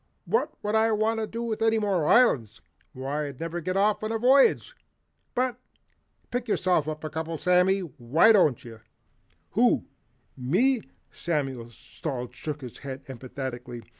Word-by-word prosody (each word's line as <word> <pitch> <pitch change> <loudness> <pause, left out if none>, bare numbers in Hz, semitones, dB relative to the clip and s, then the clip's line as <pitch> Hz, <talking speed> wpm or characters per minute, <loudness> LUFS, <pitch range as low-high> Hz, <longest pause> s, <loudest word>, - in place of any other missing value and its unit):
What 460 - 0
would 210 0 -1
I 220 +1 +3
want 220 +1 +1 0.3
with 225 -2 -3
any 225 0 +3
more 195 -7 0
islands? 120 - +3 0.3
Why 140 +3 -3
I'd 140 -3 -9
never 165 +1 -4
get 185 +3 -2
off 205 +1 +2
on 215 - -2
a 225 - 0
voyage. 260 +4 +4 0.6
But 250 -1 0 0.7
pick 245 0 -2
yourself 180 -7 +1
a 155 - -2
couple, 160 +1 -4
Sammy, 180 +3 +3
why 155 - +3
don't 155 - +3
you?" 115 -2 -10 0.7
"Who, - - +3 0.5
ME?" 220 - +2 0.3
Samuel 135 -8 -3
Salt 125 0 -6
shook 150 +4 -6
his 125 -3 -9
head 135 -1 -7
emphatically. 125 -2 -7
165 Hz, 140 wpm, -26 LUFS, 130-215 Hz, 0.7 s, voyage